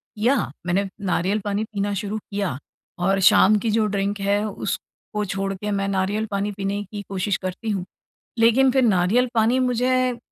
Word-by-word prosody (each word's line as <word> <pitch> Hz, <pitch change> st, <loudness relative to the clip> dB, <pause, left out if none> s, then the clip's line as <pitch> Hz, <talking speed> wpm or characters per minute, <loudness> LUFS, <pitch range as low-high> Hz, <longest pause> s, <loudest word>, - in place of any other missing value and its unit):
किया। 235 Hz, +6 st, +2 dB, 0.3 s
मैंने 195 Hz, +3 st, +1 dB, 0.2 s
नारियल 190 Hz, +3 st, +1 dB
पानी 205 Hz, +1 st, 0 dB
पीना 205 Hz, -2 st, -2 dB
शुरू 205 Hz, +2 st, -3 dB
किया 200 Hz, -8 st, -3 dB, 0.4 s
और 195 Hz, +2 st, +2 dB
शाम 215 Hz, +3 st, +6 dB
की 230 Hz, -, -1 dB
जो 220 Hz, 0 st, +2 dB
ड्रिंक 200 Hz, 0 st, -1 dB
है 200 Hz, +1 st, +1 dB
उसको 210 Hz, +1 st, -5 dB
छोड़ 195 Hz, 0 st, -2 dB
के 210 Hz, +2 st, -4 dB
मैं 195 Hz, -1 st, 0 dB
नारियल 200 Hz, +3 st, 0 dB
पानी 200 Hz, +1 st, -1 dB
पीने 200 Hz, 0 st, -3 dB
की 205 Hz, +1 st, -7 dB
कोशिश 195 Hz, +1 st, -1 dB
करती 185 Hz, +4 st, -4 dB
हूँ। 195 Hz, -4 st, -1 dB, 0.5 s
लेकिन 235 Hz, +4 st, +5 dB
फिर 265 Hz, +1 st, +2 dB
नारियल 215 Hz, +4 st, +3 dB
पानी 230 Hz, +3 st, +3 dB
मुझे, 255 Hz, 0 st, +1 dB
205 Hz, 170 wpm, -23 LUFS, 195-220 Hz, 0.5 s, शाम